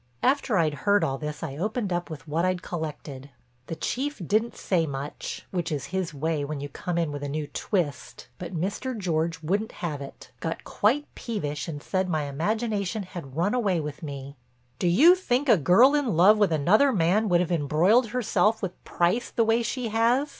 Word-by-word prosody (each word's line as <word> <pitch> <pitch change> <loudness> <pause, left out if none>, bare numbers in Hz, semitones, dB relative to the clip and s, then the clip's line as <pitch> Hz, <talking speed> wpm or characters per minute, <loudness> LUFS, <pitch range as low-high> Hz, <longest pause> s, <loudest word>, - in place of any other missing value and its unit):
After 260 -5 +2
I'd 160 -3 +2 0.2
heard 205 0 +5
all 135 0 -1
this 150 0 -5
I 140 -3 -5
opened 210 +2 -2
up 175 0 -2
with 160 0 -9
what 160 +3 0
I'd 185 0 0
collected. 145 -4 -6 0.4
The 165 - -4
Chief 275 - -3
didn't 220 +2 +1
say 170 -4 0
much, 140 +1 -6
which 175 -3 -2
is 140 -3 -2
his 185 -3 -1
way 150 +1 -2
when 145 0 -4
you 145 +1 -5
come 175 +4 -4
in 165 -3 0
with 145 -1 -5
a 145 - -4
new 150 +1 -2
"twist," 165 -1 -3
but 175 -1 -6
Mr. 210 +8 -3
George 165 -3 -1
wouldn't 200 +7 -1
have 150 -4 -3
it, 135 -2 -10
got 165 +4 -4
quite 265 +8 +1
peevish 155 -11 -4
and 150 -3 -6
said 185 -1 -1
my 155 -3 0
imagination 205 +7 -1
had 170 -8 -9
run 175 +7 +1
away 205 -8 +1
with 150 -1 -6
me. 140 -2 -7 0.4
"Do 180 - +1
you 280 - +7
think 290 -7 0
a 235 - +7
girl 195 - +5
in 265 - +1
love 205 +5 +6
with 205 -5 +3
another 185 - +4
man 200 +2 +2
would 175 -1 +4
have 180 0 -1
embroiled 170 - +3
herself 225 -2 +1
with 185 -2 -5
Price 180 +8 0
the 230 - +1
way 225 +1 +3
she 240 0 -2
has?" 235 +6 +2
180 Hz, 195 wpm, -26 LUFS, 155-220 Hz, 0.4 s, you